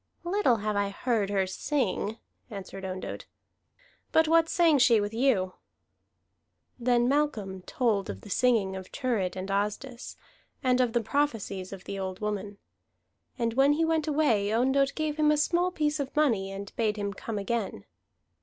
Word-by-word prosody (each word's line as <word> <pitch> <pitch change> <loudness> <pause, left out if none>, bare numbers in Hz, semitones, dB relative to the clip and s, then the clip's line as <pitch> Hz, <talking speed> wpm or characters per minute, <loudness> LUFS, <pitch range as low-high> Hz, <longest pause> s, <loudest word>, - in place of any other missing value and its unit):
"Little 350 - +2
have 215 -1 -2
I 200 0 +1
heard 215 -1 -1
her 195 -2 +1
sing," 220 0 -1 0.3
answered 195 -2 -8
Ondott. 185 0 -5 0.8
"But 320 0 +4
what 330 0 +4
sang 330 -5 +4
she 235 -3 +5
with 205 +1 -2
you?" 225 -7 +2 1.3
Then 240 0 +2
Malcolm 240 -10 0
told 230 -9 0
of 95 - -6
the - - -12
singing 215 -5 +2
of 190 -1 -7
Thurid 220 -9 -1
and 190 +1 -4
Asdis, 210 +6 -3 0.5
and 255 -1 +3
of 240 -2 +1
the 235 -2 +1
prophecies 220 -9 -1
of 195 -1 -8
the 195 - -5
old 190 -1 -4
woman. 205 -1 -3 0.8
And 230 -2 0
when 270 +4 +4
he 325 +2 +1
went 320 -1 0
away, 280 -10 +2
Ondott 265 +4 +2
gave 310 -1 -2
him 305 -1 +3
a 300 - +4
small 345 +4 +2
piece 305 -4 -1
of 275 -1 -4
money 225 -11 +2
and 200 +1 -8
bade 215 -2 0
him 200 -1 -2
come 215 +1 -5
again. 200 - -3
230 Hz, 165 wpm, -28 LUFS, 200-285 Hz, 1.3 s, she